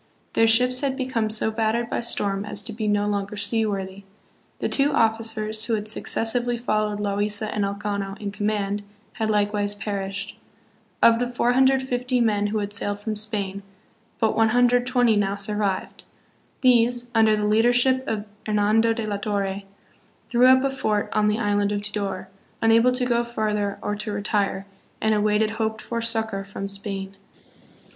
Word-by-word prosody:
Their 225 - +4
ships 250 +3 +5
had 270 -1 -1
become 255 -5 -1
so 220 0 +2
battered 225 +1 0
by - - -2
storm 200 -4 0
as 210 -1 -1
to 220 - -4
be 215 0 -3
no 205 0 +1
longer 205 0 -2
sea 220 +2 0
worthy. 195 -1 -5 0.5
The - - -2
two 280 +1 +2
officers, 220 -1 0
who 230 - 0
had 210 0 -4
successively 240 +2 0
followed 215 -3 -1
Loaisa 205 +1 -2
and 210 - -1
Elcano 200 0 -3
in 205 -1 -4
command, 205 0 -2 0.3
had 220 -2 -2
likewise 205 -1 0
perished. 200 -1 -5 0.6
Of 230 0 +6
the 245 - 0
450 250 0 +1
men 210 -3 +1
who 215 +1 -2
had 205 -1 -3
sailed 205 0 -1
from 215 +1 -4
Spain, 205 -2 -3 0.6
but 220 -1 +1
120 245 +1 +3
now 200 -1 0
survived. 200 -1 -3 0.6
These, 245 -1 +3
under 220 -1 +4
the 210 0 -1
leadership 245 +4 +3
of 215 -2 -2 0.2
Hernando 215 +2 +2
de 225 -1 -4
la 205 -1 -2
Torre, 200 -1 -2 0.7
threw 245 +1 +5
up 260 0 +6
a 275 - +1
fort 215 -6 -1
on 210 0 +2
the 210 0 +1
island 205 -2 0
of 205 0 -2
Tidor, 200 -2 -3 0.3
unable 230 +2 +4
to 250 0 0
go 240 -1 +1
farther 210 -4 -2
or 210 - -2
to 210 +1 -4
retire, 205 -1 -1 0.3
and 220 0 +1
awaited 210 +1 +1
hoped 220 0 -2
for 230 +2 -4
succor 225 -3 -1
from 195 0 -6
Spain. 195 -1 -3
215 Hz, 160 wpm, -23 LUFS, 205-230 Hz, 0.7 s, Of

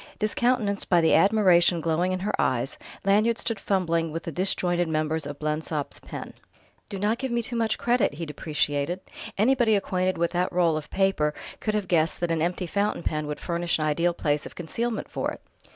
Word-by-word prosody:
Discountenanced 215 -1 0
by 175 - +5
the 160 -1 +4
admiration 185 -4 +5
glowing 165 +3 +1
in 185 0 -2
her 205 - -1
eyes, 130 +1 -1 0.3
Lanyard 215 +4 +3
stood 230 -3 -3
fumbling 170 -5 0
with 165 +2 -4
the 165 - -4
disjointed 175 0 0
members 155 -1 -1
of 145 -1 -6
Blensop's 150 -1 -2
pen. - - -8 0.6
"Do 200 - -5
not 210 +4 0
give 265 -1 -3
me 235 0 0
too 240 +1 -3
much 225 -2 +1
credit," 240 -10 +1
he 165 +2 -4
depreciated: 150 +2 -1 0.4
"anybody 235 0 +4
acquainted 185 -1 0
with 170 0 +1
that 180 +1 0
roll 170 -3 +2
of 155 -1 -5
paper 190 -6 +1 0.2
could 215 -1 -1
have 205 -3 -1
guessed 165 -2 +2
that 175 -1 0
an 165 -1 0
empty 180 +2 -1
fountain 200 +1 -1
pen 155 -1 -2
would 150 - -4
furnish 170 -1 -1
an 155 - -1
ideal 170 +3 +1
place 145 -2 0
of - - -13
concealment 225 +7 -3
for - - -2
it. - - -12
175 Hz, 195 wpm, -26 LUFS, 160-205 Hz, 0.6 s, by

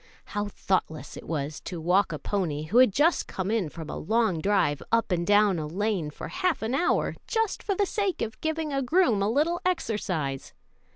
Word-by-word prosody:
How 205 0 -3
thoughtless 185 -6 -2
it - - -10
was 150 -2 -3
to 175 - -6
walk 180 +5 +2
a - - -3
pony, 165 -7 -2
who 195 +11 +3
had 255 -4 +7
just 305 - +2
come 190 +2 -3
in 215 -8 0
from 160 0 -8
a - - -5
long 220 -2 +1
drive, 195 -7 +2
up 230 -3 +2
and 175 -1 0
down 205 -3 +4
a 155 - -3
lane 190 -1 -1
for 150 - -8
half 365 -9 0
an 225 +3 -1
hour, 285 +6 +1
just 450 -3 0
for 400 - -1
the 405 - +2
sake 395 -3 -1
of 225 - -6
giving 315 -1 -2
a 275 - +1
groom 260 - +3
a 200 - +2
little 310 +8 +1
exercise! 185 - -2
210 Hz, 205 wpm, -27 LUFS, -, -, had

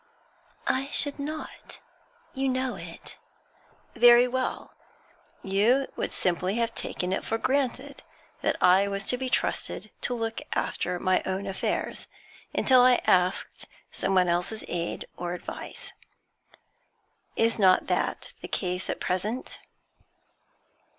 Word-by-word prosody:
'I 265 +1 +1
should 285 0 +1
not 305 +2 -6 0.5
you 270 0 0
know 260 0 0
it.' - - -10 0.8
'Very 240 +1 +7
well. 255 +1 -3 0.7
You 220 +8 +2
would - - -2
simply 180 +2 0
have 230 -1 0
taken 180 +1 -3
it - - -1
for 225 - -1
granted 270 +2 -1 0.4
that - - +1
I 190 +2 +6
was 200 0 -3
to 250 - +1
be 260 -1 -2
trusted - - -1
to 245 - 0
look 225 -1 -3
after 180 0 -1
my 185 0 +2
own 190 +1 -2
affairs, 195 -1 -2 0.4
until 255 -2 +5
I 250 0 +5
asked 180 +1 +1 0.2
someone 185 -2 +2
else's 175 +5 -1
aid 170 -1 -3
or 175 0 -3
advice. - - -7 1.4
Is 225 0 +2
not 185 -2 +5
that - - -1
the - - -6
case 180 -1 -2
at - - -2
present?' 210 +7 -2
220 Hz, 125 wpm, -27 LUFS, 185-255 Hz, 1.4 s, Very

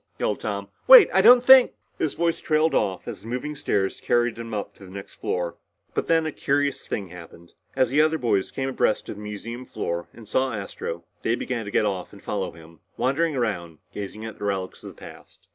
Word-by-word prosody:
yelled - - -1
Tom. - - -3 0.2
"Wait! - - +10
I 190 - +5
don't 245 +4 +8
think 260 0 +8
" - - -43
His 155 - -1
voice 170 0 0
trailed 155 0 +1
off 95 -3 0
as - - -6
the 110 - -12
moving 125 +5 -3
stair 100 -9 0
carried 120 +3 0
him 115 0 -7
up 105 -2 -4
to - - -16
the - - -13
next 100 0 -9
floor. 90 -1 -3 0.4
But - - -2
then 165 -1 +3
a 155 - -2
curious 140 0 -1
thing 100 -3 -4
happened. 85 -1 -13 0.2
As 130 -1 +1
other 155 +2 +3
boys 105 -8 0
came 135 0 -3
abreast 125 -4 0
of - - -6
the - - -9
museum 110 +4 -6
floor 85 -8 -4
and 115 -2 -14
saw 130 +3 0
Astro 90 -4 -6 0.2
they 115 - +1
began 120 -3 -4
to 100 - -6
get 105 - +2
off 95 -2 -3
and 100 - -14
follow 100 -3 -3
him, 80 -1 -16 0.2
wandering 150 +4 +1
around 90 -10 -2 0.2
gazing 105 +2 -6
at 110 - -8
the - - -7
relics 95 -2 -3
of - - -8
the - - -15
past. - - -14
115 Hz, 220 wpm, -24 LUFS, 95-145 Hz, 0.4 s, Wait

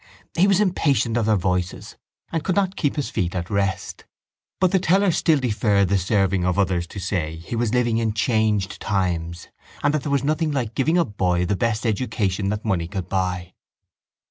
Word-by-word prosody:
He 185 +4 +4
was 195 -1 +3
impatient 150 - +1
of 115 -2 +1
their 110 - +4
voices 90 -1 -2 0.4
and 165 -2 -1
could 185 - 0
not 195 -1 +1
keep 145 - 0
his 145 - -3
feet 90 0 -1
at 90 +2 -4
rest. 100 -2 -2 0.5
But 185 -2 +3
the 190 - +3
teller 190 +2 +3
still 160 -1 +3
deferred 105 -6 +1
the 100 - +3
serving 95 -1 +1
of 90 0 0
others 90 -3 +1
to 100 - -8
say 85 -4 -2
he 85 +8 -6
was 115 0 0
living 120 -2 +2
in 110 -2 0
changed 110 -3 0
times 85 -4 -2 0.3
and 145 - +3
that 155 - 0
there 145 - -4
was 140 -2 +1
nothing 155 +2 0
like 125 -6 -2
giving 160 +8 +1
a 170 - +3
boy 90 -5 0
the 100 +3 0
best 115 +3 -1
education 105 -4 -1
that 105 +2 -3
money 90 -6 0
could 95 -1 -5
buy. 90 -1 -2
105 Hz, 195 wpm, -23 LUFS, 95-140 Hz, 0.5 s, He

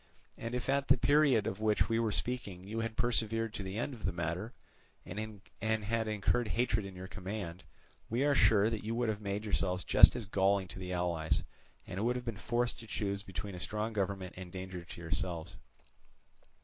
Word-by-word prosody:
And 115 +2 -4
if 125 - -3
at 140 +1 +2
the 135 - +6
period 140 -5 +4
of 95 - -2
which 110 -1 +3
we 115 0 +1
were 115 -2 +1
speaking 100 -7 -3
you 110 +2 -3
had 115 -1 -3
persevered 115 -2 +1
to 105 - -4
the 95 +1 -4
end 120 +4 -1
of 115 -5 -10
the - - +1
matter, 85 +6 -2 0.5
and 105 +1 -6 0.2
had 110 +1 0
incurred 110 +3 +1
hatred 110 -2 +1
in 95 - -10
your 90 0 -7
command, 95 -3 -5 0.5
we 120 +4 +1
are 145 - +4
sure 110 -5 +5
that 110 -2 -3
you 115 +2 -2
would 120 -1 +1
have 105 -1 -2
made 100 0 -2
yourselves 90 -4 0
just - - +8
as 120 - -3
galling 95 0 +2
to 90 - -7
the 90 -1 -5
allies, 85 -3 0 0.4
and 95 +4 -3
would 120 +2 +2
have 125 - -4
been 115 -3 -3
forced 120 +4 -1
to 115 - -10
choose 100 -2 -2
between 95 0 -6
a 90 - -6
strong 110 +4 -2
government 95 -2 -2
and 90 -1 -7
danger 95 -1 -6
to 85 - -9
yourselves. 85 +1 -3
105 Hz, 200 wpm, -33 LUFS, 95-115 Hz, 0.5 s, just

